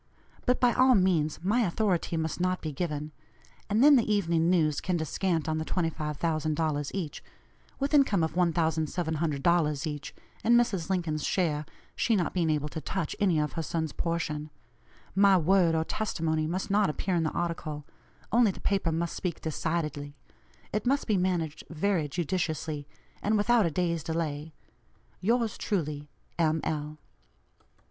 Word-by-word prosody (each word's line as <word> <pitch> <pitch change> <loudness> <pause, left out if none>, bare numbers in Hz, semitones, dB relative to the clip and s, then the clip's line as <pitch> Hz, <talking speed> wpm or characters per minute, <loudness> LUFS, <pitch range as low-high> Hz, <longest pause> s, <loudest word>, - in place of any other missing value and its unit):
But 250 - +3
by 245 -2 +4
all 255 0 +5
means 175 -6 +2
my 210 +6 +2
authority 180 -4 0
must 160 0 -2
not 185 0 +1
be 155 - -4
given. 150 -1 -3 0.6
And 215 +5 +3
then 290 -1 +8
the 225 -3 +1
Evening 170 -5 +2
News 155 -5 +2
can 180 -2 0
descant 165 +1 -1
on 155 0 0
the - - -1
$25,000 155 -2 -1
each, 170 -7 -4 0.6
with 275 +2 -1
income 265 - +4
of 160 - -1
$1,700 160 -2 +1
each, 145 -2 -5 0.3
and 235 +1 +6
Mrs. 195 -8 0
Lincoln's 165 -5 -1
share, 155 -5 0 0.3
she 230 - +2
not 180 -5 0
being 170 -3 +1
able 150 -1 0
to 160 - -6
touch 190 +6 -3
any 190 -6 +3
of 150 -2 -1
her 165 - -2
sons' 160 -1 -2
portion. 155 -3 -2 0.6
My 195 0 +5
word 175 0 +3
or 160 - +2
testimony 160 -5 -1
must 185 +4 -3
not 205 -2 +3
appear 185 +5 -2
in 170 - +2
the 160 - +1
article; 155 -4 -3 0.5
only 235 -1 +5
the 190 - -5
paper 195 -4 0
must 165 +1 -2
speak 180 -3 -3
decidedly. 150 -2 -3 0.6
It 210 +2 -1
must 275 +2 +2
be 215 - +1
managed 175 -5 -1
very 165 -1 0
judiciously, 160 -2 -2 0.3
and 215 +1 +2
without 220 -1 +3
a - - 0
day's 170 0 -1
delay. 155 -2 -3 0.6
"Yours 230 +2 0
truly, 150 -6 -2 0.3
"M. 160 -1 +2
L." 150 -1 -3
165 Hz, 155 wpm, -28 LUFS, 155-190 Hz, 0.6 s, then